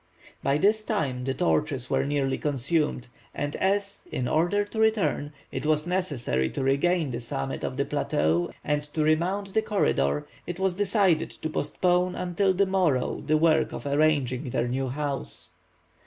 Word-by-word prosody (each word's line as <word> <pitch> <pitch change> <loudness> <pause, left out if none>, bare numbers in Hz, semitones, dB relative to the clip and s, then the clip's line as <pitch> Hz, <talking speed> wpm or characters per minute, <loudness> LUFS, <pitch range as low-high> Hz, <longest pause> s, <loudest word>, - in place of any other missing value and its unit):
By 140 +1 +2
this 210 +6 +3
time 140 - -2
the 135 - 0
torches 150 -7 0
were - - +1
nearly 140 -2 0
consumed, 145 -1 0 0.3
and 145 0 -3
as, 200 +1 0
in 125 - -2
order 175 +8 +2
to 220 +2 -6
return, 220 -9 +1 0.2
it - - -4
was 155 0 +1
necessary 145 - -1
to 135 - -3
regain 145 +3 +2
the 120 - -3
summit 115 - -4
of - - -3
the - - +1
plateau 80 +3 0
and 150 0 0
to 155 - +2
remount 185 +6 +1
the 220 - +3
corridor, 75 - +1 0.2
it 175 +1 -5
was 190 -1 +1
decided 195 -3 +2
to 160 - -6
postpone 180 +4 +1
until 180 +2 +1
the 195 +2 +2
morrow 180 -9 +1
the 155 0 +4
work 160 0 +3
of - - -6
arranging 140 -3 +1
their 120 - 0
new 130 +1 -1
home. 145 - -2
155 Hz, 165 wpm, -26 LUFS, 135-185 Hz, 0.3 s, the